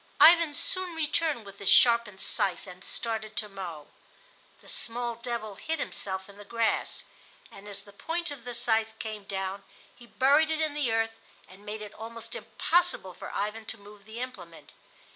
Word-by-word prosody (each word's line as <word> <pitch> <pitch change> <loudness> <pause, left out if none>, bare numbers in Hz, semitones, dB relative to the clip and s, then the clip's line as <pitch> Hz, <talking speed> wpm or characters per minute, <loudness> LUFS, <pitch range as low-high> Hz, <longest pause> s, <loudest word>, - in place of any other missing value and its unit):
Ivan 335 -2 +8
soon 370 +1 +1
returned 310 -5 +1
with 200 0 -11
his 200 - +1
sharpened 235 -5 +6
scythe 185 -3 +1
and 180 0 -11
started 220 -2 -2
to 225 -3 0
mow. 180 -7 -7 0.7
The - - -17
small 240 0 +1
devil 230 -2 -4
hid 320 0 -2
himself 190 -9 -2
in 200 0 -14
the - - -8
grass, 230 +2 0 0.5
and 200 +1 -12
as 200 -1 -5
the 200 -1 -16
point 335 +8 -1
of 275 -5 -7
the 245 0 -4
scythe 225 -2 +2
came 215 -3 -5
down 195 0 -3 0.3
he 240 - -15
buried 285 +6 +4
it 315 0 0
in 310 -2 +1
the 290 -6 +1
earth 225 0 +1 0.3
and 190 +2 -15
made 215 +1 -4
it 210 - -9
almost 230 +1 -7
impossible 345 - +1
for - - -8
Ivan 210 +2 -2
to 220 - -2
move 205 -1 -15
the 220 +2 -8
implement. 255 0 -8
225 Hz, 180 wpm, -29 LUFS, 200-255 Hz, 0.7 s, Ivan